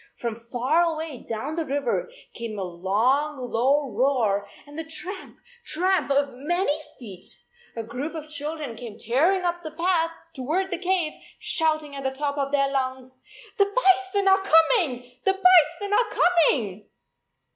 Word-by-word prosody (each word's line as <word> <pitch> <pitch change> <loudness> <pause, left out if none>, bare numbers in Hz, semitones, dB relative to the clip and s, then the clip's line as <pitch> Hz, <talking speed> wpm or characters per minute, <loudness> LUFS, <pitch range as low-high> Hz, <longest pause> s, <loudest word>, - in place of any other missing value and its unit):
From 235 -2 -4
far 245 +7 +1
away 320 -5 -2
down 225 +7 -3
the 330 - -1
river 285 - -1 0.2
came 230 -2 -6
a 195 - -2
long 220 - 0
low 260 +3 +1
roar 220 -5 +1 0.2
and 290 0 -13
the 320 - -4
tramp, 360 +4 -5 0.3
tramp 365 -1 +1
of 280 0 +2
many 295 +4 0 0.2
feet. 195 -7 -11 0.5
A 230 - -4
group 255 +9 -5
of 310 -1 -6
children 300 -3 -5
came 225 -2 -9
tearing 330 - +2
up 345 0 -1
the 315 - -6
path 330 +1 +1 0.2
toward 325 +8 -2
the 355 - -2
cave, 360 -4 0 0.2
shouting 310 -3 0
at 275 - -5
the 265 - 0
top 285 +2 -3
of 275 0 -1
their 275 -1 +2
lungs, 260 -1 -3 0.4
"The 400 - +6
bison 390 -2 +2
are 385 0 +5
coming, 320 - +2
the 385 - +3
bison 375 +1 +4
are 465 +1 +3
coming!" 275 - +2
295 Hz, 155 wpm, -25 LUFS, 250-345 Hz, 0.5 s, The